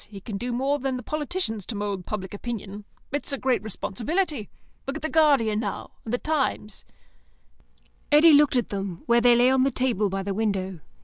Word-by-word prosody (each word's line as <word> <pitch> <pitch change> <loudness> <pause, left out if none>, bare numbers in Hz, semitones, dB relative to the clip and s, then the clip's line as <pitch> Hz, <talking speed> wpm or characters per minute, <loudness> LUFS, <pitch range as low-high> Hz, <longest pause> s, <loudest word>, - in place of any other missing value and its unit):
He 200 -2 -9
can 205 +2 -7
do 245 +4 -3
more 270 +4 0
than 265 -1 -2
the 250 - -7
politicians 305 - -2
to 225 - -4
mould 200 -3 -3
public 190 -3 -4
opinion. 205 -2 -6 0.3
It's 290 0 -2
a 275 - -1
great 255 -5 +1
responsibility. 245 - -2 0.4
Look 275 - -3
at 310 - -6
the 315 - -1
Guardian, 280 -10 +3
now; 210 -3 -4
and 220 - -5
the 245 - +1
Times." 270 -8 -2 1.3
Eddy 305 +2 +7
looked 290 -2 +5
at 245 - +1
them, 195 -4 -5
where 235 0 +4
they 240 0 +6
lay 245 +2 +5
on 265 0 +3
the 270 - +3
table 235 -6 0
by 195 0 -3
the 200 0 -2
window. 190 -4 -2
240 Hz, 195 wpm, -25 LUFS, 205-275 Hz, 1.3 s, Eddy